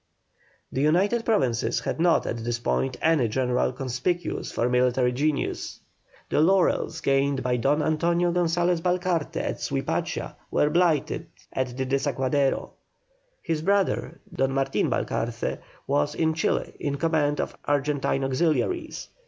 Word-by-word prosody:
The 130 - -1
United 195 +10 +2
Provinces 130 - +1
had - - -3
not 170 0 +3
at 115 - -2
this 120 +1 -2
time 130 +2 0
any 160 -7 +3
general 125 +2 +1
conspicuous 130 +7 -2
for 120 - 0
military 125 0 +2
genius. 145 +3 -2 0.5
The - - +3
laurels 170 -2 +2
gained 135 -1 +1
by 125 -1 +1
Don 145 +5 +2
Antonio 170 +3 +1
Gonsalez 175 0 +1
Balcarce 180 -3 0
at - - -2
Suipacha - - -2
were 150 - +2
blighted 170 -3 +1 0.3
at 130 -1 -2
the 130 - -1
Desaguadero. 135 0 0 0.7
His 160 -2 -1
brother, 200 +3 0
Don 135 0 0
Martin 135 0 +1
Balcarce, 115 +1 -2 0.3
was 145 +1 0
in 160 -1 +1
Chili 165 - -1
in 145 -1 -2
command 150 -1 +1
of - - -2
Argentine 145 -1 0
auxiliaries. 170 - 0
145 Hz, 130 wpm, -25 LUFS, 130-170 Hz, 0.7 s, not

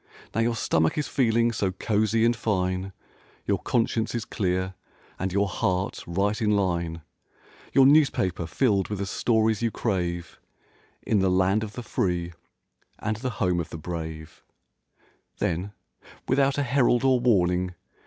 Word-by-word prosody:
Now 115 - +1
your 115 0 +1
stomach 80 - +1
is 150 - -1
feeling 115 -2 +2
so 100 -4 -1
cozy 110 +3 +1
and 120 0 +3
fine. 95 -3 -1 0.5
Your - - +1
conscience 115 -1 0
is 115 -2 -2
clear 95 -3 -1 0.5
and 95 +1 -2
your 100 +2 +1
heart 95 +1 -1
right 100 +5 0
in 105 - +2
line. 85 -4 -1 0.7
Your 135 - +6
newspaper 135 - +3
filled 100 0 +1
with 105 - -3
the 100 - -2
stories 110 +1 +1
you 115 - +2
crave 90 -6 -3 0.6
In 105 - +2
the 95 0 +2
"Land 95 +3 +2
of 105 -1 -6
the 125 - -6
free 90 -5 -1 0.6
and 110 0 -2
the 130 +3 -3
home 90 -4 +1
of 85 - -4
the - - -7
brave"— 80 -1 -7 1.0
Then, 90 +5 -2 0.6
without 135 +1 +2
a 145 - +1
herald 125 -2 +2
or 130 -2 +4
warning. 90 -6 +2
100 Hz, 150 wpm, -26 LUFS, 90-115 Hz, 1.0 s, Your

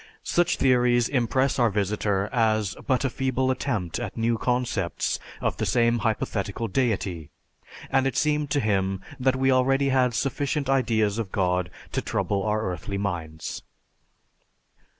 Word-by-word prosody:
Such 175 0 +1
theories 125 -2 +3
impress 130 +1 +1
our 120 -2 +4
visitor 100 -1 0
as 110 -4 +1
but 130 0 +2
a - - +2
feeble 130 0 0
attempt 100 -8 -2
at 120 -4 -5
new 115 +1 +1
concepts 125 -7 -1 0.2
of - - -1
the - - -1
same 120 -1 +3
hypothetical 110 -1 -2
deity, 95 - -1 0.6
and 135 0 +3
it 135 - -2
seemed 150 -1 +1
to 145 - +1
him 95 -4 0 0.2
that 130 0 +2
we 130 0 +2
already 135 +2 +3
had 130 -3 +2
sufficient 140 +2 -1
ideas 115 -5 +1
of 105 -5 -4
God 90 -3 0 0.2
to - - -1
trouble 100 -1 -1
our 105 +1 0
earthly 95 +1 -3
minds. 85 -5 -4
115 Hz, 145 wpm, -25 LUFS, 100-130 Hz, 0.6 s, our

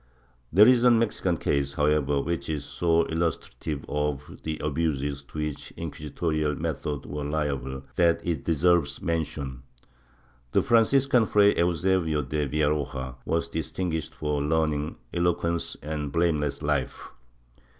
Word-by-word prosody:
There 100 +7 +8
is 125 -1 +5
a 125 - +7
Mexican 115 -7 +2
case, 70 -2 0
however, 75 -1 +2
which 85 +1 -3
is 75 -2 -2
so 85 -1 +2
illustrative 80 -2 -3
of 75 -2 -3
the 80 -1 -3
abuses 75 -2 -1
to 75 - -12
which 75 -1 -3
inquisitorial 75 -1 -2
methods 75 -3 -3
were 75 +1 -5
liable, 70 -3 -2
that 85 -1 +4
it 85 -5 -1
deserves 80 -3 +2
mention. 75 -6 -3 0.9
The - - +4
Franciscan, 120 +1 +4
Fray 105 0 +5
Eusebio 85 -2 +1
de 75 +2 -1
Villaroja, 70 -3 -1
was 85 0 0
distinguished 80 0 -3
for 75 -1 -1
learning, 75 0 0 0.2
eloquence 85 -1 0
and 75 -1 -3
blame 85 -1 +2
less 75 -1 -3
life. 70 -3 -1
75 Hz, 130 wpm, -26 LUFS, 75-85 Hz, 0.9 s, There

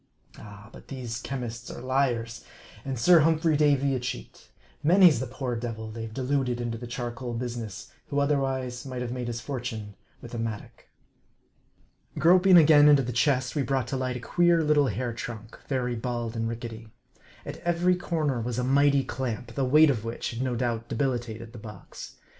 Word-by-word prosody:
Ah! 105 +1 -12
but - - -14
these 120 -3 -5
chemists 125 -3 -5
are - - -7
liars, 120 -3 -1 0.4
and 135 -2 -4
Sir 170 +8 +6
Humphrey 160 0 +3
Davy 140 -2 +3
a 130 - 0
cheat. 125 0 -7 0.3
Many's 170 -2 +6
the 130 - -3
poor 130 -1 -4
devil 115 -2 -5
they've 115 0 -6
deluded 130 0 -1
into 120 -1 -3
the 120 - -7
charcoal 120 0 -5
business, 120 -1 -5 0.2
who 140 - -3
otherwise 135 -3 0
might 130 -2 -5
have 120 - -4
made 125 -1 -4
his 115 -1 -4
for 135 -1 -4
tune 110 -4 -6 0.3
with 120 - -11
a 120 - -3
mattock. 110 -2 -6 1.3
Groping 180 +2 +6
again 150 -2 +7
into 145 -2 +6
the 125 - -3
chest, 130 +2 +1
we 145 - +1
brought 135 -2 0
to - - -2
light 130 -1 -2
a - - -7
queer 170 +6 +2
little 150 -2 +3
hair 120 +2 -2
trunk, 115 -1 -8
very 125 -3 -1
bald 120 -1 -3
and 115 0 -1
rickety. 115 -1 -7 0.6
At - - -6
every 175 +1 +1
corner 155 -8 -1
was 120 +1 -3
a 125 - 0
mighty 140 +1 +3
clamp, 120 -2 -4
the 135 +1 0
weight 150 +3 +6
of 115 -5 -3
which 115 +1 -4
had 115 +1 -5
no 130 -2 -1
doubt 115 -1 -2
debilitated 115 -3 -3
the 120 - -9
box. 105 -3 -10
125 Hz, 180 wpm, -27 LUFS, 115-140 Hz, 1.3 s, again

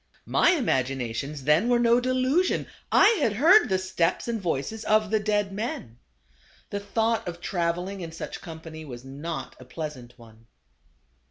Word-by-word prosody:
My 350 - +4
imaginations 135 - -1
then 155 - +3
were 245 - +4
no 235 0 +4
delusion; 255 +8 +1 0.3
I - - +7
had 225 -6 +2
heard 330 - +6
the 190 - +2
steps 185 -1 -1
and 230 -3 -2
voices 175 +6 -2
of 215 -1 +2
the 220 - +3
dead 205 -1 0
men. 195 - -5 0.7
The 205 - -2
thought 220 +1 0
of 175 -1 -5
travel 175 0 -1
ing 195 -1 -6
in 165 -2 -6
such 160 - -7
company 160 -1 -9
was 125 -4 -9
not 140 +1 -6
a 130 - -12
pleasant 130 -4 -7
one. 115 -1 -17
180 Hz, 160 wpm, -26 LUFS, 140-220 Hz, 0.7 s, I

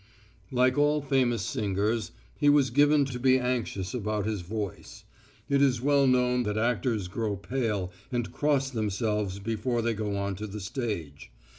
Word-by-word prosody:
Like 130 +2 +3
all 150 +1 +3
famous 125 -6 +1
singers, 105 +3 -1 0.3
he 145 - +4
was 145 -4 +4
given 145 +2 +4
to 125 -2 -5
be 130 +1 +4
anxious 120 -7 -2
about 105 -3 -2
his 105 -3 -2
voice. 100 +1 -6 0.4
It 140 -1 +2
is 130 -4 +3
well 140 +1 +3
known 125 -1 +3
that 105 -2 -2
actors 115 -3 0
grow 105 +2 -2
pale 105 -4 -2 0.2
and 120 -2 -2
cross 140 -2 +1
themselves 105 -3 -1
before 115 +3 -2
they 115 0 +1
go 105 -1 -3
on 100 0 -2
to 105 +1 -5
the 105 +1 -6
stage. 95 - -5
115 Hz, 160 wpm, -28 LUFS, 105-130 Hz, 0.4 s, he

